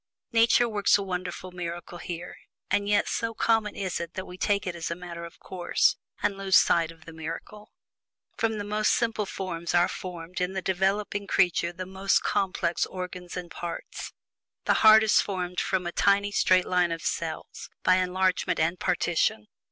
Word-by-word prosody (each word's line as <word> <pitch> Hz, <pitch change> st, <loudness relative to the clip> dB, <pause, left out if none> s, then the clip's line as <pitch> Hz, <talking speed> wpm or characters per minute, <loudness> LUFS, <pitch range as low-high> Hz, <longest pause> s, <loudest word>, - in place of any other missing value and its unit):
Nature 235 Hz, +1 st, +4 dB
works 205 Hz, -3 st, +3 dB
a 200 Hz, -, -3 dB
wonderful 185 Hz, -1 st, -5 dB
miracle 175 Hz, 0 st, -6 dB
here, 175 Hz, 0 st, -6 dB, 0.4 s
and 205 Hz, +1 st, +1 dB
yet 205 Hz, 0 st, +3 dB
so 230 Hz, -1 st, -2 dB
common 220 Hz, -2 st, +1 dB
is 190 Hz, -3 st, -2 dB
it 170 Hz, +1 st, -6 dB
that 185 Hz, -, -4 dB
we 180 Hz, -, -9 dB
take 200 Hz, +2 st, 0 dB
it 180 Hz, -, -2 dB
all -, -, -9 dB
as 165 Hz, -, -3 dB
a 170 Hz, -, -2 dB
matter 170 Hz, -1 st, -7 dB
of 170 Hz, -, -12 dB
course, 180 Hz, -2 st, +1 dB, 0.3 s
and 200 Hz, -1 st, 0 dB
lose 195 Hz, -1 st, +2 dB
sight 165 Hz, -2 st, +3 dB
of 165 Hz, -1 st, -14 dB
the 165 Hz, -, -10 dB
miracle. 165 Hz, +6 st, -8 dB, 0.6 s
From 225 Hz, -1 st, 0 dB
the 205 Hz, -, -3 dB
most 210 Hz, +1 st, +1 dB
simple 225 Hz, -3 st, -1 dB
forms 170 Hz, -3 st, -3 dB
are 175 Hz, 0 st, +5 dB
formed 180 Hz, -1 st, -6 dB
in 180 Hz, +1 st, -1 dB
the 190 Hz, -, -2 dB
developing 195 Hz, +2 st, 0 dB
creature 175 Hz, -3 st, +2 dB
the 185 Hz, +1 st, -6 dB
most 190 Hz, +1 st, +1 dB
complex 180 Hz, -3 st, 0 dB
organs 180 Hz, -1 st, -6 dB
and 175 Hz, -2 st, -6 dB
parts. 170 Hz, -1 st, -6 dB, 0.5 s
The -, -, +4 dB
heart 220 Hz, 0 st, +8 dB
is 220 Hz, -, +5 dB
formed 180 Hz, -2 st, -3 dB
from 185 Hz, -1 st, 0 dB
a 175 Hz, -, -2 dB
tiny 200 Hz, +3 st, +2 dB
straight 185 Hz, -2 st, +3 dB
line 180 Hz, -2 st, +2 dB
of 165 Hz, 0 st, -4 dB
cells, 165 Hz, -1 st, -4 dB
by 185 Hz, 0 st, +5 dB
enlargement 185 Hz, 0 st, +1 dB
and 165 Hz, +3 st, +1 dB
partition. 170 Hz, -, +1 dB
185 Hz, 185 wpm, -27 LUFS, 175-200 Hz, 0.6 s, heart